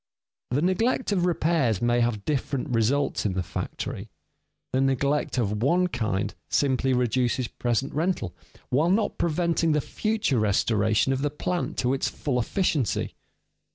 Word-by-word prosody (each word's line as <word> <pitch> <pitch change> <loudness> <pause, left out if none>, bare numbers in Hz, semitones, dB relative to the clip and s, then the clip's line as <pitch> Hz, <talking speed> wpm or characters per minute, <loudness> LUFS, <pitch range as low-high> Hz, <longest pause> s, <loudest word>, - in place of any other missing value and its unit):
_ - - +2
The 145 - +1
neglect 225 +7 +1
of 180 -3 +2
repairs 160 - +1
may 120 0 +2
have 115 -4 0
different 140 -2 -1
results 125 +4 +1
in 100 - 0
the 95 0 -1
factory. - - -5 0.6
The 130 - +2
neglect 135 +2 +1
of 105 -3 0
one 175 +8 +3
kind 110 - -1 0.2
simply 135 -1 +2
reduces 125 0 +1
present 120 +4 -1
rental 155 - -1 0.4
while 150 +7 +2
not 205 +3 +1
preventing 170 -1 +1
the 150 - +2
future 210 - 0
restoration 110 +3 +2
of 135 - -2
the 145 - +1
plant 175 +4 -3
to 125 +1 +1
its 135 - 0
full 130 -4 -2
efficiency. 140 - 0
135 Hz, 150 wpm, -26 LUFS, 120-165 Hz, 0.6 s, one